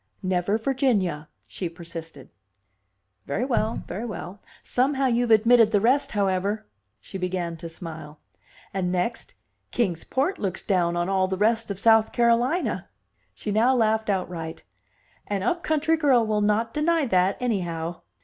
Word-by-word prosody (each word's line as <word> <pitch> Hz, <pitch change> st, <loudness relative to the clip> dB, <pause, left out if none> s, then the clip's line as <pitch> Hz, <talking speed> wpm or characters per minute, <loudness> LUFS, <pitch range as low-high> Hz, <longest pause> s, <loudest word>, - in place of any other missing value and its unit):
"Never 185 Hz, +2 st, +1 dB
Virginia," 220 Hz, -, 0 dB, 0.2 s
she 180 Hz, -, -4 dB
persisted. 165 Hz, -4 st, -10 dB, 1.0 s
"Very 200 Hz, -, -1 dB
well, 230 Hz, -3 st, -1 dB
very 195 Hz, +6 st, -5 dB
well! 200 Hz, -2 st, -7 dB, 0.2 s
Somehow 270 Hz, +2 st, +1 dB
you've 240 Hz, -1 st, +1 dB
admitted 230 Hz, +1 st, +6 dB
the 210 Hz, -2 st, +3 dB
rest, 250 Hz, +7 st, +2 dB
however." 200 Hz, +1 st, 0 dB, 0.3 s
She 190 Hz, -, -8 dB
began 180 Hz, -2 st, -2 dB
to 165 Hz, +1 st, -7 dB
smile. 160 Hz, -3 st, -9 dB, 0.5 s
"And 185 Hz, -2 st, -1 dB
next, 185 Hz, +6 st, -2 dB, 0.3 s
Kings 185 Hz, -9 st, -1 dB
Port 285 Hz, +9 st, -1 dB
looks 190 Hz, -4 st, -2 dB
down 175 Hz, -3 st, +1 dB
on 175 Hz, 0 st, 0 dB
all 190 Hz, -1 st, +2 dB
the 190 Hz, 0 st, -2 dB
rest 225 Hz, +2 st, +1 dB
of 195 Hz, -1 st, -4 dB
South 225 Hz, 0 st, +4 dB
Carolina." 240 Hz, +8 st, +1 dB, 0.5 s
She 210 Hz, -, -4 dB
now 235 Hz, +5 st, +3 dB
laughed 220 Hz, -2 st, +1 dB
outright. 175 Hz, -4 st, -3 dB, 0.6 s
"An 200 Hz, -2 st, -2 dB
up 340 Hz, -, 0 dB
country 315 Hz, +1 st, +1 dB
girl 265 Hz, -7 st, +4 dB
will 215 Hz, -1 st, 0 dB
not 215 Hz, +2 st, +1 dB
deny 320 Hz, 0 st, +2 dB
that, 190 Hz, -3 st, +2 dB
anyhow!" 175 Hz, -8 st, -2 dB
210 Hz, 145 wpm, -25 LUFS, 180-235 Hz, 1.0 s, admitted